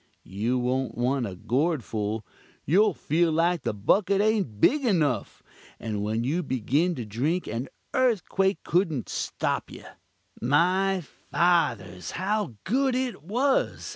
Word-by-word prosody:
You 110 Hz, +6 st, -1 dB
won't 125 Hz, +1 st, -1 dB
want 125 Hz, 0 st, 0 dB
a 95 Hz, -, -7 dB
gourd 135 Hz, -, 0 dB
full 110 Hz, 0 st, -3 dB, 0.4 s
you'll 195 Hz, +5 st, +4 dB
feel 165 Hz, +2 st, +1 dB
like 170 Hz, +2 st, +2 dB
the -, -, -1 dB
bucket 190 Hz, -, +2 dB
ain't 205 Hz, -, +1 dB
big 295 Hz, -, +4 dB
enuf, 150 Hz, -, 0 dB, 0.4 s
and 105 Hz, -2 st, -3 dB
when 110 Hz, +2 st, -1 dB
you 155 Hz, +8 st, 0 dB
begin 145 Hz, +6 st, 0 dB
to 120 Hz, -, -5 dB
drink 140 Hz, -, -1 dB
an 115 Hz, +5 st, -4 dB, 0.2 s
earthquake 195 Hz, -7 st, +1 dB
couldn't 165 Hz, -, 0 dB
stop -, -, -2 dB
you. -, -, -11 dB, 0.6 s
My 180 Hz, +8 st, +2 dB
fathers, 135 Hz, -, 0 dB
how 195 Hz, -, -1 dB
good 260 Hz, +5 st, +1 dB
it 255 Hz, -5 st, -2 dB
was! 245 Hz, -, 0 dB
160 Hz, 135 wpm, -26 LUFS, 120-195 Hz, 0.6 s, you'll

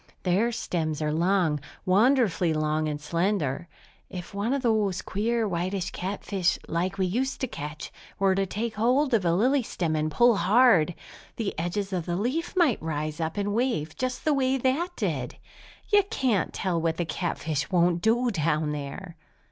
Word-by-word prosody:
Their 195 Hz, +6 st, +2 dB
stems 160 Hz, -9 st, -2 dB
are 150 Hz, 0 st, 0 dB
long, 170 Hz, -2 st, +2 dB, 0.3 s
wonderfully 200 Hz, -, +3 dB
long 155 Hz, 0 st, 0 dB
and 150 Hz, -1 st, -3 dB
slender. 170 Hz, -1 st, -1 dB, 0.4 s
If 180 Hz, +1 st, -8 dB
one 205 Hz, +4 st, -1 dB
of 275 Hz, -1 st, 0 dB
those 215 Hz, -5 st, +1 dB
queer, 225 Hz, +2 st, 0 dB
whitish 185 Hz, +1 st, -2 dB
catfish, 190 Hz, -1 st, -1 dB
like 180 Hz, +4 st, -1 dB
we 190 Hz, -, +1 dB
used 255 Hz, +8 st, -1 dB
to 260 Hz, -, 0 dB
catch, 150 Hz, -7 st, -7 dB, 0.3 s
were 195 Hz, -1 st, +3 dB
to 195 Hz, 0 st, 0 dB
take 220 Hz, +4 st, -3 dB
hold 250 Hz, +5 st, +2 dB
of 210 Hz, -6 st, +2 dB
a 170 Hz, 0 st, +3 dB
lily 260 Hz, +8 st, +3 dB
stem 170 Hz, -8 st, -2 dB
and 155 Hz, 0 st, 0 dB
pull 240 Hz, +6 st, +4 dB
hard, 185 Hz, -3 st, +4 dB, 0.4 s
the 215 Hz, -4 st, -2 dB
edges 195 Hz, +4 st, -2 dB
of 175 Hz, -3 st, -2 dB
the 175 Hz, -, -1 dB
leaf 265 Hz, -, -2 dB
might 330 Hz, -, +3 dB
rise 155 Hz, 0 st, -3 dB
up 160 Hz, +3 st, -3 dB
and 205 Hz, 0 st, -1 dB
wave 225 Hz, -, -1 dB
just 255 Hz, 0 st, -3 dB
the 305 Hz, -, +3 dB
way 265 Hz, -1 st, +2 dB
that 270 Hz, +7 st, 0 dB
did! -, -, -2 dB, 0.6 s
You 410 Hz, -, +8 dB
can't 255 Hz, -, 0 dB
tell 175 Hz, -3 st, -1 dB
what 165 Hz, 0 st, 0 dB
the 175 Hz, -, -1 dB
catfish 160 Hz, -4 st, -2 dB
won't 175 Hz, -1 st, +2 dB
do 240 Hz, +3 st, +2 dB
down 155 Hz, -3 st, 0 dB
there!" 150 Hz, +5 st, -6 dB
190 Hz, 170 wpm, -26 LUFS, 165-235 Hz, 0.6 s, You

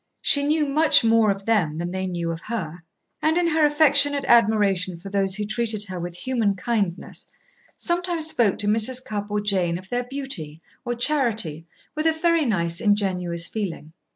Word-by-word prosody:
She 285 Hz, -, +4 dB
knew 300 Hz, +1 st, +1 dB
much 300 Hz, 0 st, +4 dB
more 225 Hz, -1 st, +4 dB
of 195 Hz, 0 st, -2 dB
them 180 Hz, -9 st, +1 dB
than 175 Hz, +1 st, -4 dB
they 190 Hz, 0 st, -3 dB
knew 170 Hz, -2 st, -3 dB
of 165 Hz, 0 st, -6 dB
her, 180 Hz, -8 st, -5 dB, 0.4 s
and, 315 Hz, +2 st, +2 dB
in 350 Hz, -, +2 dB
her 320 Hz, -1 st, +2 dB
affectionate 290 Hz, -1 st, +2 dB
admiration 200 Hz, -6 st, +3 dB
for 195 Hz, +3 st, -10 dB
those 195 Hz, -1 st, 0 dB
who 210 Hz, 0 st, -3 dB
treated 215 Hz, 0 st, -1 dB
her 185 Hz, -3 st, -7 dB
with 175 Hz, 0 st, -6 dB
human 225 Hz, -1 st, -1 dB
kindness, 195 Hz, -3 st, -3 dB, 0.5 s
sometimes 345 Hz, -2 st, -1 dB
spoke 235 Hz, -10 st, +2 dB
to 205 Hz, -, -1 dB
Mrs. 225 Hz, +4 st, +1 dB
Cupp 205 Hz, -1 st, -4 dB
or 210 Hz, 0 st, -1 dB
Jane 185 Hz, -5 st, 0 dB
of 185 Hz, +1 st, -13 dB
their 245 Hz, 0 st, -2 dB
beauty 245 Hz, -, -6 dB, 0.2 s
or 240 Hz, -1 st, -3 dB
charity 225 Hz, -, 0 dB, 0.3 s
with 310 Hz, +1 st, -1 dB
a 320 Hz, -, +3 dB
very 330 Hz, -1 st, +1 dB
nice, 170 Hz, -7 st, -1 dB
ingenuous 185 Hz, -5 st, 0 dB
feeling. 175 Hz, -6 st, -5 dB
210 Hz, 180 wpm, -23 LUFS, 185-270 Hz, 0.5 s, She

